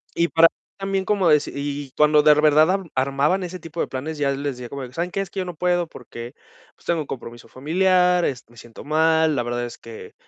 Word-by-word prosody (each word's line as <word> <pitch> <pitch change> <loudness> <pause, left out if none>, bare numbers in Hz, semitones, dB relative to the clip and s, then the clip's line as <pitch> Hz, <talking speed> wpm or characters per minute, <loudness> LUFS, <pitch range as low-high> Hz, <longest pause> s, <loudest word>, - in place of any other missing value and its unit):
Y 170 - +2
para 165 0 +6
mí - - -58 0.2
también 195 -1 -2
como 195 -2 +1
deci 150 -1 +3
y 140 -1 -4
cuando 150 0 +5
de 150 - +7
verdad 155 +1 +4
am 190 -4 -2
armaban 140 +8 +1
ese 180 0 -6
tipo 165 +1 -9
de - - 0
planes, 150 +4 -5
ya 140 -1 +1
les 140 +1 -4
decía 125 -1 -8
como 140 +1 -6
de: 125 -1 -9
"¿Saben 170 +5 -2
qué? 195 - -2
Es 195 - -5
que 195 - -5
yo 185 - -2
no 180 - -7
puedo 175 0 0
porque, 120 -3 -10 0.4
pues - - -26
tengo 170 -1 0
un 145 - -7
compromiso 120 -2 -8
familiar, 180 +5 +2
es 130 -3 -3
me 120 - -20
siento 115 0 -12
mal". 160 +1 +2
La 125 - 0
verdad 120 0 -3
es 120 - -9
que 115 -1 -11
155 Hz, 245 wpm, -22 LUFS, 135-175 Hz, 0.4 s, de